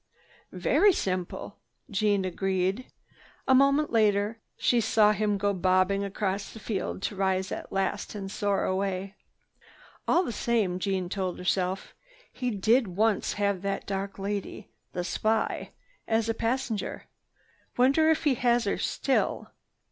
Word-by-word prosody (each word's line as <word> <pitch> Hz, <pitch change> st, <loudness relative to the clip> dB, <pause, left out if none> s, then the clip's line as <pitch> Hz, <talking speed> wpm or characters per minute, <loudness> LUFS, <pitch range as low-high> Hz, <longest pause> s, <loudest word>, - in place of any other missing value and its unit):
"Very 410 Hz, -2 st, +3 dB
simple," 185 Hz, -, -3 dB, 0.3 s
Jeanne 205 Hz, -1 st, +1 dB
agreed. 190 Hz, +5 st, -1 dB, 0.6 s
A 265 Hz, -, +5 dB
moment 275 Hz, +3 st, +4 dB
later 215 Hz, 0 st, +2 dB, 0.2 s
she 240 Hz, -1 st, +2 dB
saw 215 Hz, -1 st, +4 dB
him 210 Hz, 0 st, 0 dB
go 200 Hz, +1 st, +1 dB
bobbing 185 Hz, +2 st, +2 dB
across 200 Hz, 0 st, -2 dB
the 220 Hz, -, -10 dB
field 195 Hz, -2 st, -3 dB
to 205 Hz, -, -2 dB
rise 190 Hz, -1 st, 0 dB
at -, -, -6 dB
last 195 Hz, +2 st, -2 dB
and 195 Hz, -2 st, -5 dB
soar 200 Hz, -1 st, 0 dB
away. 190 Hz, 0 st, -2 dB, 0.9 s
"All 355 Hz, -, +4 dB
the 245 Hz, -, -3 dB
same," 215 Hz, -5 st, 0 dB
Jeanne 190 Hz, -1 st, -1 dB
told 185 Hz, -1 st, -3 dB
herself, 185 Hz, +1 st, -1 dB, 0.4 s
"he 250 Hz, -1 st, -2 dB
did 225 Hz, +3 st, +2 dB
once 205 Hz, +3 st, +1 dB
have 200 Hz, -2 st, 0 dB
that 195 Hz, 0 st, -2 dB
dark 195 Hz, 0 st, -4 dB
lady, 200 Hz, 0 st, -4 dB, 0.2 s
the 180 Hz, -, -3 dB
spy, 220 Hz, +4 st, -1 dB, 0.4 s
as 225 Hz, 0 st, +1 dB
a 225 Hz, -, +1 dB
passenger. 230 Hz, -2 st, -2 dB, 0.7 s
Wonder 275 Hz, +6 st, +4 dB
if 320 Hz, -, +2 dB
he 295 Hz, -4 st, +4 dB
has 240 Hz, -1 st, +2 dB
her 200 Hz, -, -1 dB
still?" 270 Hz, -, 0 dB
200 Hz, 140 wpm, -28 LUFS, 190-225 Hz, 0.9 s, A